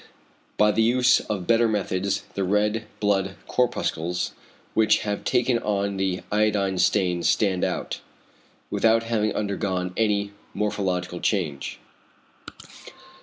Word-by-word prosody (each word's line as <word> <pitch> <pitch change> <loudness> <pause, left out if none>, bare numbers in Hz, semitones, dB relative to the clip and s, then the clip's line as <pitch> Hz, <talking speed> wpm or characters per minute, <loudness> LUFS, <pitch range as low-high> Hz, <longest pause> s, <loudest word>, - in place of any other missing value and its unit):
By 105 0 +5
the 115 - +1
use 125 +2 +4
of 100 -4 -4
better 115 +2 +4
methods 100 -2 -1
the 100 - -1
red 105 +3 +1
blood 95 -2 +1
corpuscles 90 -8 -1 0.4
which 110 0 +3
have 105 -1 -3
taken 125 -1 +2
on 100 -2 -1
the 95 -1 -1
iodine 105 -3 +1
stain 90 -2 +2
stand 95 -1 +2
out, - - -2 0.7
without 115 0 +3
having 110 -2 0
undergone 95 -3 -2
any 105 -2 +1 0.2
morphological 90 -4 -1
change. 80 -11 -1
100 Hz, 115 wpm, -24 LUFS, 95-110 Hz, 0.7 s, By